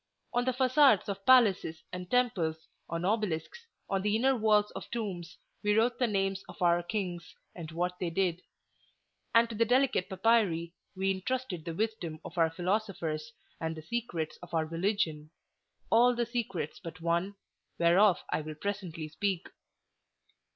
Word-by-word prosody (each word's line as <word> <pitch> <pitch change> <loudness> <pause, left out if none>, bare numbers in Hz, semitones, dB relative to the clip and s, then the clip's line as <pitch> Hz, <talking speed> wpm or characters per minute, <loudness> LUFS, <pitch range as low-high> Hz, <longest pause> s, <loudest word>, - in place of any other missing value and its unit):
On 245 0 +1
the 255 - +2
facades 260 -3 +4
of 195 0 -4
palaces 210 -10 +4
and 180 0 -6
temples, 175 -11 +1 0.2
on 165 +1 -2
obelisks, 210 - -2 0.2
on 195 -1 0
the 210 +1 +1
inner 265 +4 +3
walls 210 -2 +3
of - - -8
tombs, 195 -7 -5 0.2
we 210 0 +2
wrote 240 +2 +2
the 250 - +3
names 195 -2 -1
of 180 - -11
our 175 -1 +3
kings, 175 -2 -4 0.2
and 165 -2 -8
what 180 +2 -2
they 180 - -1
did; 180 0 0 0.9
and 230 0 +6
to 230 - -7
the 225 +2 +2
delicate 250 -4 +2
papyri 190 -5 +2 0.2
we 190 +1 +1
intrusted 190 -3 -3
the 165 -2 -4
wisdom 185 -7 -2
of 170 - -8
our 165 -1 +4
philosophers 175 -4 -2 0.3
and 160 0 -3
the 155 - -9
secrets 175 -6 -3
of 175 -1 -7
our 160 -1 +2
religion—all 175 +6 -1
the 240 0 0
secrets 220 - -3
but 165 +1 -8
one, 170 +4 0 0.4
whereof 175 +3 +4
I - - 0
will 155 0 -7
presently 180 -3 -4
speak. 185 +3 -2
190 Hz, 155 wpm, -30 LUFS, 170-225 Hz, 0.9 s, and